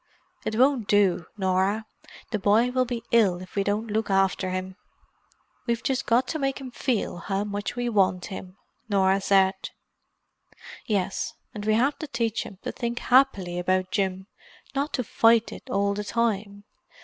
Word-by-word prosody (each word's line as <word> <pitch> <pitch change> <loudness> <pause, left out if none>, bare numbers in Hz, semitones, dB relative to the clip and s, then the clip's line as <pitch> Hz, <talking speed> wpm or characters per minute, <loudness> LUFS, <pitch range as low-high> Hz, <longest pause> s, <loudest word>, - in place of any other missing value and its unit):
It 220 - -2
won't 255 -2 +3
do, 195 -5 +3
Norah: 190 +3 +1 0.5
the 215 - -1
boy 215 +5 +3
will 255 0 +2
be 240 -2 -4
ill 200 -7 +4
if 185 0 -12
we 200 - +2
don't 205 +2 -1
look 220 0 -1
after 195 -1 +2
him." 185 0 -4 0.9
"We've 235 0 -1
just 265 0 -1
got 245 +2 +3
to 315 - -2
make 270 -1 -1
him 260 -2 -8
feel 240 -7 -1
how 195 +3 -2
much 205 +1 -4
we 245 0 -2
want 190 -5 +2
him," 190 -1 -8 0.3
Norah 195 -1 +3
said. 190 -1 +4 1.3
"Yes. 195 -3 -1 0.2
And 210 -1 -6
we 215 0 +3
have 270 +6 +1
to 310 - -5
teach 230 -3 -2
him 195 - -12
to - - -3
think 235 0 -4
happily 205 -11 +3
about 185 +1 0
Jim—not 200 +8 -4
to 250 - 0
fight 225 0 +3
it - - -11
all 200 -3 +1
the 210 +1 -3
time. 205 -3 -1
210 Hz, 165 wpm, -26 LUFS, 190-235 Hz, 1.3 s, ill